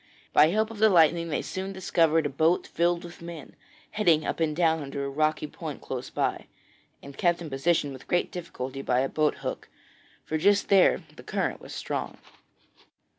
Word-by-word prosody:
By 150 - +7
help 215 +6 0
of 220 - -9
the 220 0 +6
lightning 170 -2 +4
they 150 - -1
soon 190 +1 -5
discovered 165 -4 +2
a - - 0
boat 160 +6 +2
filled 170 0 0
with 175 0 -11
men, 170 -3 -9 0.4
heading 170 -7 +2
up - - -2
and 155 -2 0
down 160 -1 +2
under 140 0 -4
a - - -3
rocky 155 +2 0
point 150 -1 -7
close 130 -1 -6
by, - - -2 0.6
and 140 0 -10
kept 175 +2 +1
in 165 -4 -8
position 145 +1 +1
with 130 - -12
great 175 - 0
difficulty 135 -6 -6
by 125 -2 +1
a 135 - +1
boat 155 -1 +1
hook, - - -4 0.6
for 155 - -2
just 200 +4 +3
there 195 -2 +5
the - - -9
current - - -2
was - - -9
strong. - - -4
160 Hz, 185 wpm, -27 LUFS, 145-175 Hz, 0.6 s, By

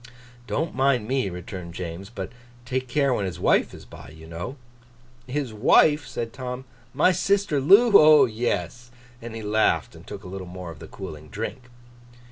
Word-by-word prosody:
'Don't 160 +5 -2
mind 130 -4 +1
me,' 130 -5 0
returned 90 -1 -8
James; 90 +2 -6
'but 100 -4 -6 0.3
take 130 +1 -2
care 140 +1 +1
when 105 - -1
his 90 - -6
wife - - +2
is - - -12
by, - - -12
you 80 +1 -13
know.' 85 +10 -6 0.7
'His 130 -3 -3
wife?' 145 +7 +4
said 115 -1 -5
Tom. 130 0 -6 0.3
'My 150 +8 +4
sister 195 -6 +1
Loo? 200 - +6
O 155 -6 +8
yes!' 115 -1 -3 0.3
And 115 -1 -8
he 110 - -6
laughed, 110 +1 +1
and - - -15
took - - -8
a - - -9
little 95 0 -7
more 90 -1 -8
of 75 - -12
the 80 - -10
cooling 75 -4 -9
drink. 115 - -6
115 Hz, 175 wpm, -24 LUFS, 90-135 Hz, 0.7 s, O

